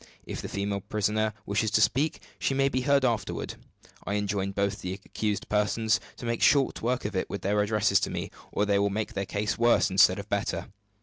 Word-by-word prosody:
If - - -5
the - - -6
female 100 0 -2
prisoner 105 +1 0
wishes 105 +2 0
to 105 - +2
speak, 140 +10 +1 0.2
she 135 - 0
may 135 0 +3
be 130 -1 -1
heard 140 +1 +3
afterward. 115 -4 -1 0.5
I 100 - -2
enjoin 100 -1 -1
both 100 0 -1
the 90 0 -3
accused 100 +1 -3
persons 105 0 +1 0.2
to - - -8
make 115 -1 -1
short 140 -2 +3
work 125 +1 -1
of 105 -1 -3
it 95 - -1
with 100 - -5
their 105 +2 +2
addresses 105 -2 +3
to - - -1
me, - - -4 0.2
or 105 - +1
they 100 -1 +2
will 100 0 +2
make 110 +3 -3
their 100 -2 -3
case 105 +2 -2
worse 120 -3 +4
instead 95 - +5
of - - -6
better. - - -2
105 Hz, 210 wpm, -28 LUFS, 100-115 Hz, 0.5 s, instead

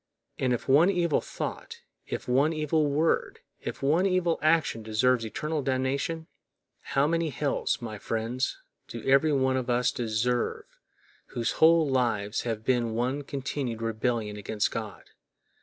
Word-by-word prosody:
And 130 - +1
if 120 - -2
one 150 +7 +6
evil 175 -5 +1
thought, - - -6 0.3
if - - -5
one 140 +6 +3
evil 155 0 +1
word, 150 +3 0 0.2
if - - -6
one 165 +7 +3
evil 180 -3 +1
action 155 -7 +2
deserves 115 +3 +2
eternal 150 +7 -3
damnation, 135 +5 -1 0.6
how 140 +1 +1
many 165 +1 +1
hells, 140 -2 -1
my 110 -3 -6
friends, 115 +5 -2 0.3
do - - -7
every 140 +3 +5
one 130 -2 +2
of 130 -1 -3
us 125 0 +2
deserve 120 +1 -1 0.7
whose 115 -1 0
whole 165 -1 +5
lives 115 -6 0
have 110 -2 -4
been 120 -3 +1
one 130 +5 -1
continued 135 -4 -4
rebellion 115 -1 -1
against 105 +1 -1
God! - - -6
130 Hz, 140 wpm, -28 LUFS, 115-150 Hz, 0.7 s, one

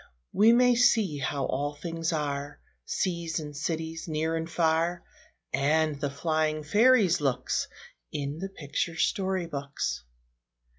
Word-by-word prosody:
We 220 +3 +6
may 245 +1 +5
see 225 -10 +3
how 140 0 -1
all 145 +2 -2
things 165 +1 -3
are, 145 -2 -3 0.3
Seas 170 -2 -1
and 150 -2 -7
cities, 160 +2 -3
near 160 +1 -1
and 165 0 -3
far, 170 +1 +1 0.5
And 150 +2 +1
the 145 - 0
flying 155 +1 -1
fairies' 205 -1 +4
looks, 130 -3 0 0.4
In 145 +2 -4
the 195 +2 -4
picture 165 -1 -3
story 190 +1 0
books. 140 - -4
160 Hz, 130 wpm, -28 LUFS, 145-175 Hz, 0.5 s, We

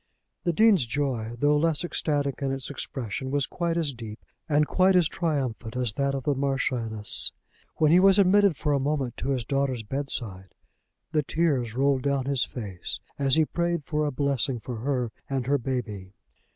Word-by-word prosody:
The 175 - +3
Dean's 195 - +4
joy, 120 -4 -2
though 145 +4 +3
less 160 +1 +2
ecstatic 145 -5 -1
in 135 -1 0
its 135 +1 -4
expression, 130 -2 -4
was 140 -1 0
quite 170 -1 -2
as 155 -4 0
deep 110 -3 -8 0.3
and 150 0 +3
quite 185 +4 +3
as 175 -3 +5
triumphant 130 -10 -3
as 125 -4 -1
that 140 +2 0
of 135 - -4
the 145 - +1
Marchioness. 130 -6 +2 0.4
When 155 -1 +3
he 175 - +7
was 195 +1 +6
admitted 200 -3 +4
for 150 +1 0
a 140 - +2
moment 135 -3 -1
to 135 - -3
his 130 -4 -1
daughter's 135 -3 -1
bedside, 110 -7 -4 0.6
the 155 -2 +2
tears 140 -7 0
rolled 135 0 +2
down 140 -1 0
his 135 -2 +1
face 100 -8 -6 0.2
as 135 -1 +3
he 160 -1 +4
prayed 170 -2 -2
for 150 0 0
a - - -1
blessing 135 -2 0
for 120 +2 -6
her 125 -1 -1 0.2
and 135 -3 -1
her 140 +2 +2
baby. 110 -7 -4
140 Hz, 180 wpm, -26 LUFS, 125-150 Hz, 0.6 s, he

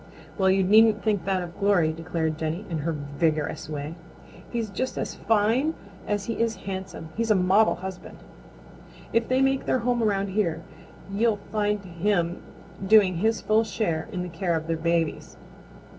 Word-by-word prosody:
"Well, 190 -2 +2
you 190 0 +3
needn't 215 +2 +5
think 205 -6 0
that 190 -2 0
of 175 +1 -10
Glory," 190 -6 +3
declared 165 -1 -2
Jenny 160 +6 -3
in 160 - -1
her 165 +3 -1
vigorous 150 0 -2
way. 150 +1 -4 0.6
"He's 230 -4 -3
just 255 +6 -3
as - - -3
fine 225 +8 +1 0.3
as 205 -1 -1
he 230 - -3
is 230 -1 +1
handsome. 190 -4 -6
He's 230 0 -1
a 215 - +5
model 190 +4 +4
husband. 185 +1 -8 1.0
If 230 0 +2
they 255 +1 +2
make 270 0 +1
their - - +3
home 245 -1 +2
around 200 -2 +1
here 170 -5 -1 0.5
you'll 220 +1 +2
find 210 -1 0
him 175 0 -1 0.4
doing 195 -3 +5
his 220 +5 +1
full 215 +1 +3
share 190 -6 -2
in 180 -3 -3
the 180 - -5
care 170 0 -1
of 160 0 -2
their 165 0 -1
babies. 165 0 -1
190 Hz, 170 wpm, -26 LUFS, 165-215 Hz, 1.0 s, needn't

